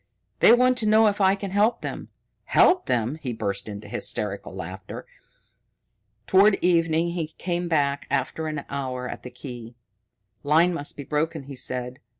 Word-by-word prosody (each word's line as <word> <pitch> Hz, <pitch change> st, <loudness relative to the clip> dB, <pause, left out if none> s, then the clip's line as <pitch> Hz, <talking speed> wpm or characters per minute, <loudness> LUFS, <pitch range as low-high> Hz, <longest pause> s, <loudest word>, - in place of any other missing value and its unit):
"They -, -, +7 dB
want 250 Hz, +1 st, +4 dB
to 220 Hz, -, 0 dB
know 220 Hz, +1 st, +5 dB
if 205 Hz, -1 st, +1 dB
I 190 Hz, 0 st, +5 dB
can 195 Hz, -1 st, -6 dB
help 210 Hz, +4 st, +2 dB
them. -, -, -6 dB, 0.4 s
Help 365 Hz, 0 st, +4 dB
them!" 120 Hz, +6 st, 0 dB
He 125 Hz, -4 st, -3 dB
burst 100 Hz, -2 st, -3 dB
into 105 Hz, 0 st, -8 dB
hysterical -, -, -2 dB
laughter. -, -, -8 dB, 1.2 s
Toward 195 Hz, +2 st, +5 dB
evening 165 Hz, -2 st, +2 dB
he 170 Hz, -3 st, -3 dB
came 175 Hz, -1 st, -2 dB
back 145 Hz, -4 st, 0 dB
after 160 Hz, -1 st, -1 dB
an 150 Hz, -2 st, -4 dB
hour 130 Hz, -2 st, -4 dB
at -, -, -7 dB
the 125 Hz, -, -8 dB
key. 120 Hz, -2 st, -9 dB, 0.7 s
"Line 160 Hz, +5 st, +3 dB
must 145 Hz, -3 st, -5 dB
be 140 Hz, -, -6 dB
broken," 155 Hz, +2 st, -2 dB
he 140 Hz, 0 st, -9 dB
said. 125 Hz, 0 st, -4 dB
155 Hz, 160 wpm, -24 LUFS, 125-190 Hz, 1.2 s, They